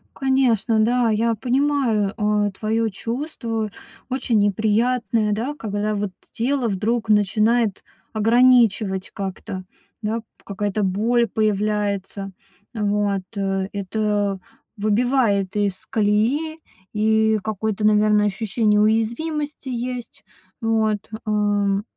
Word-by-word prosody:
Конечно, 250 -5 +2
да. 235 +1 +3
Я 230 +2 +2
понимаю, 250 -5 +1
э, 210 -1 +1
твоё 220 +3 -1
чувство. 230 - -4 0.4
Очень 250 -4 +1
неприятное, 220 +2 +1
да, 250 +8 -2
когда 210 -3 -2
вот 205 -1 -2 0.2
тело 250 +1 0
вдруг 220 +3 -1
начинает 215 +1 +2 0.3
ограничивать 220 -4 +3
как-то, 190 -1 -5 0.4
да, 220 +2 -1 0.2
какая-то 205 +1 -2
боль 225 +5 +2
появляется. 205 -2 -1 0.4
Вот, 205 -2 0
э, 195 -1 -1
это 205 0 -1 0.4
выбивает 210 -2 +1
из 200 -2 -1
колеи, 230 +10 +1 0.4
и 220 0 +2
какое-то, 215 0 -2
наверное, 210 0 +4
ощущение 210 +1 +1
уязвимости 265 +8 0
есть. 245 0 -5 0.4
Вот, 220 -2 +1 0.3
эм. 205 -1 +1
215 Hz, 95 wpm, -22 LUFS, 205-235 Hz, 0.4 s, наверное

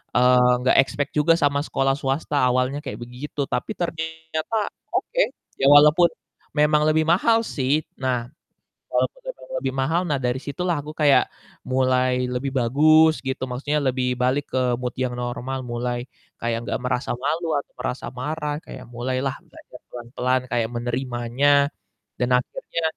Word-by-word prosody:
eee, 125 0 +5
nggak 130 - +3
expect 145 +1 -3
juga 160 +3 +5
sama 140 -1 +2
sekolah 135 -2 +1
swasta 140 +1 -2
awalnya 130 +3 +1
kayak - - -5
begitu, 125 +5 -6
tapi 125 - -2
ternyata 160 +3 -3 0.4
oke, - - 0 0.4
ya - - +3
walaupun 150 +4 +7 0.5
memang 150 0 +4
lebih 155 0 +2
mahal 225 +7 +4
sih. 135 -6 -1 0.2
Nah 125 -3 -1 0.7
walaupun - - 0
memang - - -15
lebih 130 - -2
mahal, 150 +6 +1
nah 145 -3 +1
dari 125 +1 0
situlah 170 +5 -2
aku 150 +2 -8
kayak 145 -2 +5 0.4
mulai 130 0 +2 0.2
lebih 130 +2 -2
bagus 155 +6 +5
gitu, 130 0 -3
maksudnya 145 +4 -1
lebih 125 -1 0
balik 130 +3 +1
ke 130 - +2 0.2
mood 125 -1 -3
yang 125 -1 -1
normal, 125 +2 -3
mulai 120 +1 -2 0.4
kayak 115 0 -1
nggak 105 - -2
merasa 125 +1 -1
malu 160 +5 -1
atau 140 - -8
merasa 125 - -3
marah 150 +2 -3
kayak 130 - -10
mulailah 130 +2 -2
belajar - - -15
pelan-pelan 125 +1 -1
kayak 115 -2 0
menerimanya 120 +2 -1 0.7
dan 125 0 0
akhirnya 145 +6 -5
130 Hz, 145 wpm, -23 LUFS, 125-150 Hz, 0.7 s, walaupun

